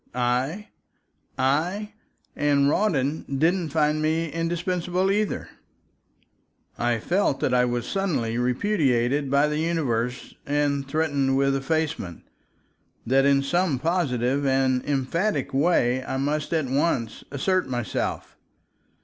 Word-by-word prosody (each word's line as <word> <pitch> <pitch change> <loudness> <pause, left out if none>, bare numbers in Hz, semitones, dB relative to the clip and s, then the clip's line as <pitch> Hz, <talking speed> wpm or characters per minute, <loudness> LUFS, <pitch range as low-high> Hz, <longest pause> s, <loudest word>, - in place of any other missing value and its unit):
I! 125 +11 -1 0.7
I! 175 +11 0 0.4
And 145 -1 +2
Rawdon 150 -4 +1
didn't 170 +3 +1
find 150 0 +1
me 160 +1 0
indispensable 175 +3 -1
either. 210 +1 -1 1.3
I 120 -1 0
felt 175 - 0
I 125 0 +3
was 120 -1 -2
suddenly 165 - -1
repudiated 130 - +1
by 140 +2 +3
the 150 0 -1
universe 125 -8 -1
and 140 -1 0
threatened 140 -3 +1
with 135 0 +2
effacement, 150 - -2 0.8
that 135 +3 +3
in 140 0 +3
some 175 0 +1
positive 140 -4 0
and 130 -2 +2
emphatic 145 +3 -1
way 130 -4 +2
I 130 - -3
must 145 +2 -1
at 160 -3 +1
once 130 -4 -1
assert 185 +7 0
myself. 120 -3 -3
145 Hz, 110 wpm, -25 LUFS, 130-165 Hz, 1.3 s, I